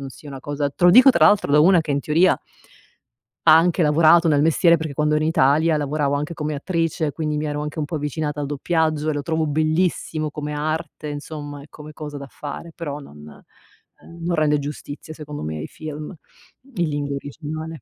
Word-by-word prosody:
non 135 - -6
sia 145 - -13
una 135 -1 -8
cosa 145 0 -2
te 175 - -3
lo 175 - +8
dico 255 +7 +8
tra 170 -10 +5
l'altro 205 -6 +3
da 150 - +6
una 175 +2 +6
che, 155 - -6
in 140 - 0
teoria 165 +6 +3 1.1
ha 160 -1 +8
anche 175 +2 +2
lavorato 160 +2 +5
nel 145 -2 +3
mestiere, 165 +2 +4
perché 160 -2 -5
quando 150 +1 +1
in - - 0
Italia 155 0 +3
lavoravo 145 -1 -1
anche 150 +3 -3
come 150 -1 -3
attrice, 165 0 -1
quindi 150 0 -3
mi 150 - -2
ero 150 -1 -3
anche 150 +1 -6
un 155 - -1
po' 150 +3 -4
avvicinata 150 0 -3
al 145 - -2
doppiaggio 155 +1 0
e - - 0
lo 145 - -2
trovavo 160 +2 -1
bellissimo 155 0 0
come 150 0 -5
arte, 155 0 -4
insomma, 145 -1 -7
e 140 - -14
come 150 0 -11
cosa 150 -1 -8
da 140 -1 -8
fare. 150 +3 -8
Però 150 -4 -5
non, 75 - -13
ehm 75 - -18
non 175 0 0
rende 150 -2 +2
giustizia, 145 +1 -7
secondo 150 -2 -8
me, 80 0 -4
ai 75 - -5
film 155 +1 -8 0.6
in 175 -4 0
lingua 145 -1 -3
originale. 155 +1 -7
150 Hz, 205 wpm, -22 LUFS, 145-160 Hz, 1.1 s, lo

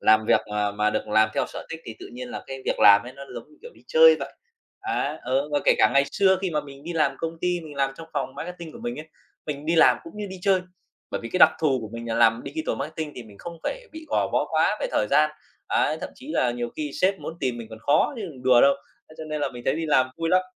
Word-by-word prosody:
làm 110 0 +4
việc - - +4
mà 105 -1 0
mà 105 +1 +1
được 105 - -3
làm 110 +1 +4
theo - - +1
sở - - -9
thích 165 0 -6
thì 110 - -8
tự - - -9
nhiên 125 0 -7
là - - -7
cái 135 0 -7
việc - - -1
làm 100 -1 +8
ấy 125 +2 -9
nó 140 +1 -11
giống - - -8
như, 310 - -21
kiểu, 480 - -10
đi - - -20
chơi 485 0 +7
vậy. - - -5 0.5
Đấy, 155 - -1
ừ, 135 +4 0
và 145 - +2
kể - - +5
cả - - +5
ngày 140 0 +5
xưa 190 -2 +4
khi 185 - 0
mà 150 -2 0
mình 140 -1 -12
đi 175 - -4
làm 155 -4 +2
công 165 0 -4
ty, 180 -1 0
mình 155 -3 -10
làm 135 -1 +1
trong 165 0 -10
phòng - - -3
marketing 170 -2 -7
của - - -11
mình 240 -4 -5
ấy, 155 - -12 0.4
mình 150 0 -5
đi 165 +1 +1
làm - - +6
cũng 330 - -11
như 210 -1 -4
đi 190 0 -8
chơi. 190 -2 +3 0.5
Bởi - - -3
vì 115 - -6
cái 185 - +1
đặc - - +9
thù 140 -5 +2
của 110 - -7
mình 115 0 -6
là 115 - -1
làm 115 0 +4
digital 155 +3 -3
marketing 155 +1 -5
thì 125 - -7
mình 105 -3 -16
không 170 -1 -8
phải - - -4
bị 320 0 -9
gò - - +1
bó - - +1
quá - - +2
về - - 0
thời - - +1
gian. 155 0 +4 0.4
Ấy, 155 - +1
thậm - - -5
chí 265 +4 -13
là 125 - +2
nhiều 120 0 -4
khi 150 -2 -3
sếp 190 +1 +2
muốn 165 - -6
tìm 125 -3 -1
mình 115 -1 -8
còn 110 - -9
khó 145 - +2
chứ 220 - -5
đừng 145 -9 -8
đùa 125 -2 +6
đâu. 140 - +6 0.4
Thế 155 - -15
cho 160 - -6
nên 155 -1 -4
là - - 0
mình 120 -1 -9
thấy 135 - +2
đi 165 -1 -2
làm 130 -3 +3
vui 165 0 -2
lắm. 185 +1 +4
150 Hz, 295 wpm, -25 LUFS, 125-170 Hz, 0.5 s, đặc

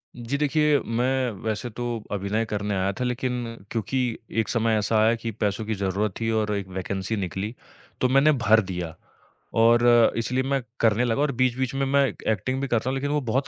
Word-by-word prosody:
जी, 120 +3 -3
देखिए 150 0 +3
मैं 125 +2 0
वैसे 110 +2 -2
तो 120 +2 -5 0.3
अभिनय 105 +3 -1
करने 105 -1 -2
आया 95 +1 +1
था - - 0
लेकिन 125 -2 -2
क्योंकि 115 +3 -1 0.4
एक 110 - -5
समय 115 -2 +2
ऐसा 110 +1 +1
आया 110 +2 +4
कि 115 0 -5
पैसों 105 0 -2
की 110 0 -2
जरूरत 100 +1 -1
थी 115 - -1
और 105 -1 -1
एक 100 -2 -4
वैकेंसी 95 +3 -2
निकली 95 +3 -3 0.5
तो 125 - +3
मैंने 135 +3 +5
भर 110 -4 +4
दिया। 85 -3 -4 0.7
और 120 +1 +5 0.3
इसलिए 125 +3 0
मैं 135 0 0 0.2
करने 115 +2 +3
लगा 120 +4 0
और 145 -1 +2
बीच-बीच 130 0 +1
में 135 0 +1
मैं 140 +1 +3
एक् 105 - -8
एक्टिंग 130 +6 -1
भी 140 - -1
करता 120 0 0
हूँ 135 - -1
लेकिन 145 +2 -2
वो 150 -1 +1
बहुत 135 +2 0
115 Hz, 200 wpm, -25 LUFS, 105-130 Hz, 0.7 s, मैंने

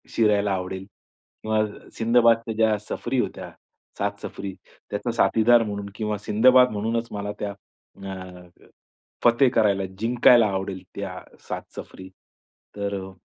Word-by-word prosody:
शिरायला 105 -2 +3
आवडेल 95 0 -4 0.6
किंवा 110 0 +1 0.3
सिंदबादच्या 115 0 +3
ज्या 110 -1 +3
सफरी 105 - -3
होत्या, - - -3 0.5
7 100 0 -2
सफरी, 100 -1 -6 0.4
त्याचा 105 +4 -2
साथीदार 115 +1 +4
म्हणून 100 -2 -4
किंवा 105 -1 -2
सिंदबाद 125 +5 +5
म्हणूनच 115 +3 -2
मला 105 0 -4
त्या 100 -1 -3 0.6
अ, 90 -1 -9 0.8
फते 120 +3 +5
करायला, 100 -5 +2
जिंकायला 120 0 +5
आवडेल, 95 -1 -4
त्या - - -5 0.3
7 - - -3
सफरी. 95 0 -9 0.7
तर 100 0 -3
अ, 95 - -9
105 Hz, 120 wpm, -24 LUFS, 100-115 Hz, 0.8 s, सिंदबाद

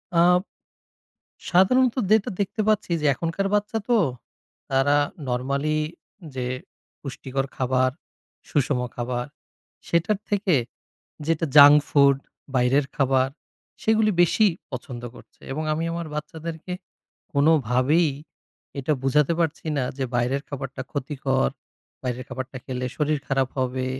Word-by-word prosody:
আ - - +5 1.3
সাধারণত 235 +8 +4 0.2
যেটা 215 -1 +4
দেখতে 200 +2 -1
পাচ্ছি 215 -3 +1
যে 150 - +1
এখনকার 165 +7 -2
বাচ্চা 210 +2 0
তো 240 -2 +4 0.7
তারা 135 +2 +3 0.3
নরমালি 140 +5 0 0.6
যে 125 -1 -2 0.5
পুষ্টিকর 135 -1 -4
খাবার, 130 0 +2 0.6
সুষম 140 -3 +1
খাবার 120 0 -2 0.6
সেটার 170 +5 +1
থেকে 200 -3 +2 0.7
যেটা 165 0 +1
জাঙ্ক 145 0 +10
ফুড 140 -1 +5 0.4
বাইরের 130 +3 +3
খাবার 135 -1 +3 0.5
সেগুলো 220 -1 +3
বেশি 210 +5 +4 0.3
পছন্দ 125 -1 -6
করছে। - - -17
এবং 155 +3 -3
আমি 160 +2 -1
আমার 170 0 -4
বাচ্চাদেরকে 160 +3 -6 0.6
কোনভাবেই 145 +1 +3 0.7
এটা 140 +3 0
বুঝাতে 140 +3 +3
পারছি 165 -1 -1
না 135 - +1
যে 135 - 0
বাইরের 125 +3 +1
খাবারটা 135 -2 -5
ক্ষতিকর, 135 -1 0 0.5
বাইরের 125 -1 -3
খাবারটা 130 0 -6
খেলে 125 -1 -3
শরীর 150 0 +1
খারাপ 135 -1 +1
হবে। 130 0 -1
140 Hz, 115 wpm, -24 LUFS, 130-165 Hz, 1.3 s, জাঙ্ক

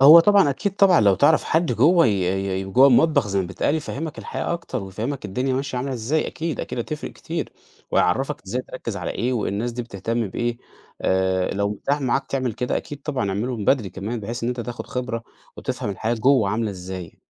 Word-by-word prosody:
هو 155 +5 +10
طبعًا، 200 -5 +5
أكيد 195 +8 -2
طبعًا 195 -3 +6
لو 100 -2 +5
تعرف 145 - +4
حد 160 -4 +1
جوّه 165 +8 +5
ي 95 -1 0
ي - - -4
جوّه 125 +8 +5
المطبخ 145 0 +4
زي 100 0 +1
ما 90 - -2
بيتقال، 145 - 0
يفهّمك 155 0 -4
الحياة - - -3
أكتر 150 -9 -4
ويفهّمك 115 +8 -4
الدنيا 130 +6 -1
ماشية 135 -1 -2
عاملة 135 +1 -2
إزاي، 130 +6 0
أكيد، 160 -1 -3
أكيد - - -5
هتفرِق 150 +5 -4
كتير. - - -5 0.4
وهيعرّفك 135 +10 +1
إزاي 125 +6 -2
تركِّز 115 -5 -5
على 90 -3 -3
إيه، 125 +2 -1
والناس 115 +1 -1
دي 120 +1 -3
بتهتم 115 +1 -2
بإيه، 120 +4 -2 0.4
آآ، 95 0 +1
لو 100 0 0
مُتاح 140 +8 -1
معاك 135 +1 0
تعمل 130 -3 -1
كده، 125 +2 -1
أكيد 145 -1 -7
طبعًا 135 -9 -2
اعملُه 115 +6 -2
من 105 - -4
بدري 115 -6 +2
كمان، 110 +5 -4
بحيث 115 +3 -5
إن 120 - 0
أنت 125 -1 -2
تاخد 120 +1 -6
خبرة 125 -2 -3 0.3
وتفهم 105 - -3
الحياة 110 +4 -1
جوّه 120 -2 +3
عاملة 110 +1 0
إزاي. 90 -2 -7
120 Hz, 200 wpm, -23 LUFS, 100-140 Hz, 0.4 s, هو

